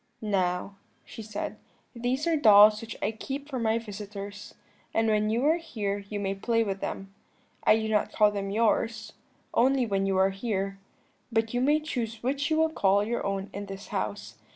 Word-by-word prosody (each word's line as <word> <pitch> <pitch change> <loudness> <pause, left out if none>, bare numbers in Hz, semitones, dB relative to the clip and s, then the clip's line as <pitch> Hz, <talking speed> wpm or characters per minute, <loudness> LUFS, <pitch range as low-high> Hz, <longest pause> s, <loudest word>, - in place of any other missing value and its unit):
"'Now,' 195 -2 -1 0.3
she - - -9
said, 215 -1 -5 0.4
'these 245 +4 -1
are 335 -1 +2
dolls 210 -5 +7
which 230 0 -7
I 210 - +1
keep 275 +6 -6
for 265 -4 -4
my 225 -1 +1
visitors, 205 -2 -8 0.4
and 225 0 +3
when 215 -1 +2
you 235 +5 +1
are 315 +3 +4
here 210 -12 -3
you 210 - -3
may 195 -1 -1
play 230 +3 +1
with 195 -2 -3
them. 195 0 -5 0.5
I 215 - +6
do 220 0 -2
not 215 -1 +1
call 210 -1 +4
them 200 -1 -3
yours, 220 +1 0 0.4
only 260 +1 +3
when 195 -3 0
you 195 -1 +1
are 190 +1 +4
here; 195 -1 -3 0.5
but 225 0 0
you 245 - +1
may 295 +4 +3
choose 235 -7 -4
which 280 +4 0
you 315 - +2
will 320 0 +3
call 200 -7 +3
your 235 +3 -2
own 195 0 -3
in 200 +1 -6
this 195 +1 -8
house. - - -4
215 Hz, 190 wpm, -28 LUFS, 200-240 Hz, 0.5 s, dolls